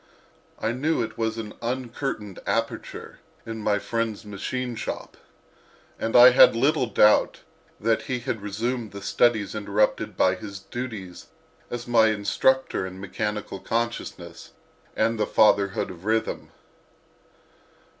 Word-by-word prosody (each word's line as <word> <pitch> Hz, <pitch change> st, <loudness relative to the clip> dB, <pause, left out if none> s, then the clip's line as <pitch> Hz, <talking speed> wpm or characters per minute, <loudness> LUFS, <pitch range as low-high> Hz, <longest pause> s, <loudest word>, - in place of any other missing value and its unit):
I 110 Hz, -, -1 dB
knew 135 Hz, +2 st, 0 dB
it 115 Hz, -, -6 dB
was 110 Hz, 0 st, -2 dB
an 105 Hz, -2 st, -6 dB
uncurtained 120 Hz, -4 st, -4 dB
aperture -, -, -3 dB, 0.3 s
in 115 Hz, 0 st, -6 dB
my 105 Hz, -1 st, +1 dB
friend's 110 Hz, +1 st, -3 dB
"machine 120 Hz, +5 st, -4 dB
shop," -, -, -6 dB, 0.8 s
and 115 Hz, -, -2 dB
I 125 Hz, +1 st, +10 dB
had 125 Hz, -, +7 dB
little 135 Hz, +2 st, +2 dB
doubt 105 Hz, -1 st, +4 dB, 0.4 s
that 115 Hz, +1 st, +1 dB
he 125 Hz, -, -3 dB
had 115 Hz, -3 st, -3 dB
resumed 110 Hz, +3 st, -3 dB
the 100 Hz, -, -7 dB
studies 110 Hz, -4 st, +2 dB
interrupted 105 Hz, -1 st, 0 dB
by 95 Hz, -, +4 dB
his 100 Hz, +1 st, -7 dB
duties 110 Hz, -7 st, -7 dB, 0.4 s
as 120 Hz, 0 st, -5 dB
my 115 Hz, -2 st, +5 dB
instructor 110 Hz, +1 st, +1 dB
in 95 Hz, 0 st, -9 dB
mechanical 105 Hz, 0 st, -4 dB
consciousness 115 Hz, +3 st, -4 dB, 0.4 s
and 115 Hz, +1 st, +1 dB
the 105 Hz, -, +1 dB
fatherhood 100 Hz, -2 st, +3 dB
of 90 Hz, -1 st, -12 dB
Rhythm. 110 Hz, +2 st, -1 dB
110 Hz, 125 wpm, -25 LUFS, 105-120 Hz, 0.8 s, I